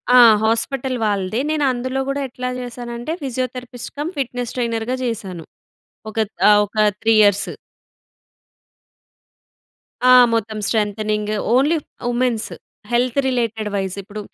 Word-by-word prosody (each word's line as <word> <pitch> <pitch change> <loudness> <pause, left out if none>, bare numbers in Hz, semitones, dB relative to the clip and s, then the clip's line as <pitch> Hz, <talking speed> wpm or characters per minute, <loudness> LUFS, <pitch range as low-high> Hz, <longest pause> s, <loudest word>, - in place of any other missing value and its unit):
ఆ! - - +9 0.3
హాస్పిటల్ 250 +3 0
వాళ్ళదే. 205 +2 -1
నేను 305 -1 0
అందులో 255 +2 -3
గూడా 280 +1 -1
ఎట్లా 250 +1 -4
జేశానంటే, 240 +3 -5
ఫిజియోథెరపిస్ట్ 255 -1 -5
కమ్, 300 +5 -3
ఫిట్నెస్ 245 -2 -3
ట్రైనర్‌గా 230 +1 -1
జేశాను. 195 -8 -4 0.7
ఒకట్ 220 -1 -2 0.2
ఆహ్, 210 0 +7
ఒక 210 +2 -14 0.2
3 225 0 +3
ఇయర్స్. 205 -1 +3 2.6
ఆ! 255 - +7 0.2
మొత్తం 220 -1 -1
strengthening, 210 -1 -1 0.2
only 295 +5 +3 0.3
women's. 240 -2 0 0.4
Health 245 +2 +1
related 230 -4 -1
vice 190 -1 -2
ఇప్పుడు 210 +2 -8
235 Hz, 115 wpm, -20 LUFS, 215-255 Hz, 2.6 s, ఆ